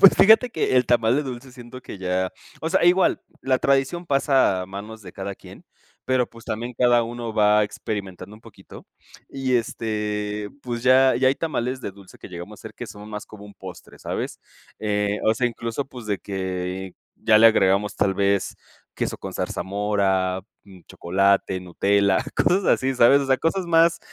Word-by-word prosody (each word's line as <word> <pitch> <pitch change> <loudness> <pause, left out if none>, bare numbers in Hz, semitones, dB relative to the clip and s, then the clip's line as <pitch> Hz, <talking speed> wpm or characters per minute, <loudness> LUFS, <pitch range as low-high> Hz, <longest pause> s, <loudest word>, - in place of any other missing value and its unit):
Pues 195 - +9
fíjate 220 +4 +6
que 130 - 0
el 125 - +4
tamal 120 +1 +3
de 150 - +1
dulce 130 -1 -7
siento 125 0 -11
que - - -9
ya 95 0 -1 0.3
o 160 - -2
sea, 185 -1 +2
igual, 180 +2 +3 0.2
la 130 -1 +1
tradición 140 +6 +1
pasa 135 - +2
a - - -8
manos 105 +3 -8
de 90 - -11
cada 95 0 -6
quien, - - -15 0.4
pero, 130 -1 +1
pues, 115 -1 -15
también 120 +3 -4
cada 120 -1 +4
uno 115 -1 -5
va 105 0 +4
experimentando 100 -1 -5
un 110 - -16
poquito - - -14 0.4
y, 130 -2 -2
este, 105 -2 -2
pues, 120 -1 -4
ya 130 +1 +5
ya 130 +1 +3
hay 135 - +2
tamales 130 -5 -3
de 100 - -5
dulce 100 -1 -16
que - - -11
llegamos 90 +3 -9
a - - -15
hacer 110 -1 -10
que 120 - -7
son 105 0 -11
más 105 -1 -6
como 105 -1 -12
un 100 - -13
postre, 90 -2 -12
¿sabes?, - - -4 0.4
eh, 105 -1 -1
o 110 - +4
sea, 125 +2 +1
incluso, 115 +3 -4
pues, 125 -5 -11
de 100 -2 -1
que 95 -1 -4 0.2
ya 110 - +4
le 115 - +8
agregamos 100 -1 +3
tal 95 -1 +1
vez 100 0 0 0.4
queso - - -3
con - - -8
zarzamora, 95 -2 -1 0.2
mm, 95 -3 -15
chocolate, 95 +1 +1
Nutella, 100 +2 +2 0.2
cosas 190 +2 +2
así, 130 0 +2
¿sabes?, 125 +4 +6
o 135 - -3
sea, 130 -1 +3
cosas 180 +3 0
más 165 0 +4
110 Hz, 185 wpm, -23 LUFS, 100-130 Hz, 0.4 s, Pues